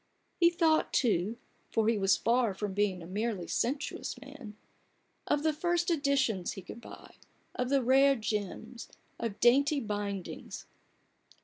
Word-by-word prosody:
He 340 -1 +6
thought, 330 -2 +2
too, 215 -2 +1 0.3
for 220 -1 +1
he 225 -2 +2
was 195 -1 +3
far 230 -3 +1
from 205 0 -3
being 195 -3 0
a - - -9
merely 200 0 -2
sensuous 265 - -2
man, 270 -6 -11 0.7
of 295 0 +1
the 315 -1 +2
first 345 +2 0
editions 275 - +1
he 195 - -9
could 235 - -10
buy, - - -13 0.4
of 250 0 -2
the 275 -1 +2
rare 270 +3 +5
gems, 220 +1 -4 0.3
of 225 -3 -4
dainty 280 +5 +4
bindings. 205 -5 -5
235 Hz, 140 wpm, -31 LUFS, 205-280 Hz, 0.7 s, He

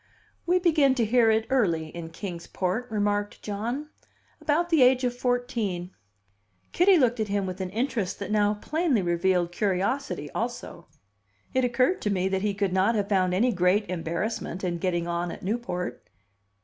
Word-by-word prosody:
"We 360 +1 +4
begin 310 -7 +3
to 235 -3 +1
hear 230 +1 +4
it 220 0 +2
early 170 -12 +1
in 165 0 -7
Kings 170 0 -7
Port," 195 +7 -2
remarked 205 -1 -1
John. 235 +9 -3 0.5
"About 340 +4 +1
the 320 -4 +4
age 255 +1 +5
of 245 -1 0
fourteen." 240 -8 -2 0.8
Kitty 370 +1 +5
looked 245 -5 +2
at 215 - 0
him 200 -1 -1
with 185 0 -5
an 185 - -3
interest 215 -3 -2
that 200 0 -5
now 210 0 +2
plainly 295 - 0
revealed 175 0 +1
curiosity 190 - -1
also. 230 -7 -5 0.7
It 260 0 +2
occurred 255 +9 +2
to 210 - -1
me 190 -2 +1
that 190 0 -1
he 205 -1 -1
could 200 -2 -1
not 190 +5 +3
have 205 -1 -1
found 185 -3 +2
any 240 +6 +3
great 185 +3 +2
embarrassment 180 +2 -3
in 175 -2 -1
getting 175 -1 -1
on 170 0 -2
at - - -9
Newport. 200 -3 -3
205 Hz, 170 wpm, -26 LUFS, 180-245 Hz, 0.8 s, age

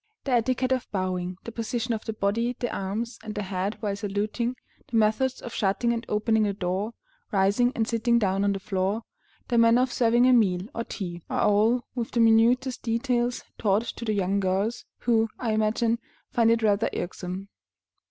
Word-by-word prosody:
The 275 - -3
etiquette 255 +2 +1
of 255 -1 -1
bowing, 185 -2 -2
the 230 - -7
position 230 +1 -2
of 220 - -4
the 220 - -3
body, 225 +4 0
the 245 - -2
arms, 215 +5 -3
and 215 -1 -6
the 210 - -2
head 190 +2 -2
while 205 -3 -1
saluting, 210 +4 -2 0.3
the 240 - -4
methods 225 +4 +1
of 240 - -7
shutting 210 +4 +1
and 230 0 -4
opening 220 +1 +2
the 205 -1 +1
door, 195 +4 -2 0.4
rising 205 +5 +3
and 225 -1 0
sitting 235 0 +2
down 195 -3 +1
on 200 0 +2
the 195 - -3
floor, 195 +3 -1 0.5
the 240 -2 +3
manner 230 +2 +5
of 255 -2 -2
serving 240 0 +4
a 255 - +6
meal, 190 -7 +3
or 230 - -3
tea, 175 -4 -6
are - - 0
all, 220 +4 +3
with 240 -3 -3
the 235 - -1
minutest 235 +3 +4
details, 240 +1 0 0.2
taught 210 0 +2
to 235 - -6
the 220 -2 0
young 200 0 +1
girls, 195 +5 -1 0.2
who, 225 -2 +2
I 235 -3 -1
imagine, 220 +2 +1 0.3
find 230 -1 +3
it 230 0 +2
rather 210 0 +2
irksome. 185 +2 -5
225 Hz, 190 wpm, -26 LUFS, 200-235 Hz, 0.5 s, a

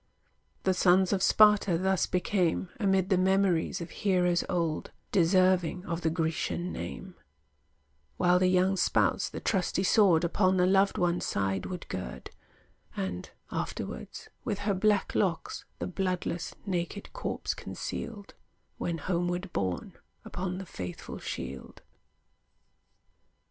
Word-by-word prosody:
The 190 - +3
sons 185 +1 +4
of 190 - 0
Sparta 210 -4 +5
thus 190 +1 +1
became, 180 -1 0
Amid 190 -3 +2
the 190 -3 +3
memories 190 -3 +2
of 165 -1 -6
heroes 180 -3 +1
old, 165 -4 -1 0.2
Deserving 185 0 +3
of 170 -1 -3
the 160 - +1
Grecian 165 +2 -2
name; 85 - -6 1.0
While 180 0 +4
the 185 - +3
young 185 +1 +3
spouse - - +2
the - - -6
trusty 190 -2 0
sword 190 -5 +5
Upon 185 +2 +2
the 180 - +4
loved 195 +1 +3
one's 175 0 +1
side 95 -1 -1
would 180 -2 -6
gird, 90 -10 -6 0.7
And, 90 -2 -3 0.2
afterwards, - - -5 0.2
with 205 - -2
her 205 - +2
black 205 +1 +2
locks, 180 -5 -1
The - - -3
bloodless, 180 -2 -2
naked 185 +1 -3
corpse - - -3
concealed, 205 -4 -6 0.5
When 170 -1 -2
homeward 175 +2 -2
borne 95 -3 -2 0.3
upon 180 0 -4
the 190 - -6
faithful 90 - -7
shield. 65 0 -7
180 Hz, 125 wpm, -29 LUFS, 170-190 Hz, 1.0 s, Sparta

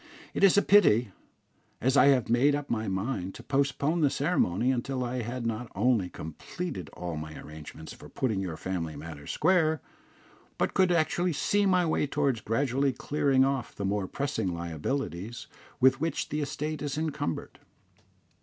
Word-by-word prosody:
"It - - -1
is 195 0 +7
a 205 - +5
pity, 120 - +5 0.7
as 130 +3 +2
I 140 - +7
had 130 -4 +4
made 130 +5 +4
up 145 0 -4
my 110 -1 -1
mind 95 -1 -2
to - - -10
postpone 140 +4 +1
the 145 - +4
ceremony 130 - +1
until 130 +1 -2
I 125 0 -2
had 120 +1 -4
not 115 +1 -3
only 105 -3 +2
completed 95 - -6
all 85 -3 -5
my 75 0 -6
arrangements 75 +1 -9
for - - -13
putting 110 -7 -1
your 85 -4 -4
family 85 -4 -3
matters 75 -1 -9
square, 160 -2 +2 0.8
but - - 0
could 185 -1 +3
actually 175 +1 +1
see 205 +7 +2
my 180 -2 +3
way 155 -2 +1
towards 140 -5 0
gradually 135 +4 +1
clearing 135 -1 +2
off 135 -2 -2
the 100 - -3
more 100 -1 0
pressing 135 -9 -2
liabilities 85 - -4 0.3
with 130 +1 +4
which 165 -2 -1
the 150 +1 -2
estate 150 +1 -3
is 145 -1 -3
encumbered. 155 - -3
130 Hz, 165 wpm, -28 LUFS, 95-145 Hz, 0.8 s, is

